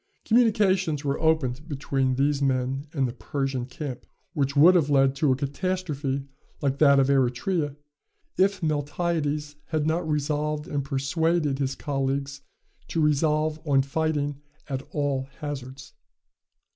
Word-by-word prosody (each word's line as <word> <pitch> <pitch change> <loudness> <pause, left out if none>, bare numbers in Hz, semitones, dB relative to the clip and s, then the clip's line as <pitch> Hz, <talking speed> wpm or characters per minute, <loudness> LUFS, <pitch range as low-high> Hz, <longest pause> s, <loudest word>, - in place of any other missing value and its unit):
Communications 195 - +2
were 140 0 0
opened 155 -3 +1
between 135 -2 0
these 140 +1 +1
men 135 +1 0
and 135 -4 0
the 120 - -5
Persian 135 -1 -3
camp, 135 -2 -6 0.3
which 140 -4 0
would 160 +6 +8
have 160 -6 +3
led 135 -1 +4
to 140 -1 +3
a - - +3
catastrophe 140 -2 -2 0.3
like 140 -1 -1
that 140 -2 +6
of 135 - +4
Eretria, 140 +4 +1 0.6
if 195 -1 +2
Miltiades 150 -1 -1
had 155 -2 -1
not 160 +1 0
resolved 150 0 -1
and 145 -1 -2
persuaded 150 +2 0
his 135 -1 -1
colleagues 135 0 -2 0.5
to 165 - -2
resolve 155 +1 +2
on 140 -4 +3
fighting 145 -1 -1 0.3
at 135 -2 -3
all 140 -2 -1
hazards. 135 -3 -7
145 Hz, 135 wpm, -26 LUFS, 135-155 Hz, 0.6 s, would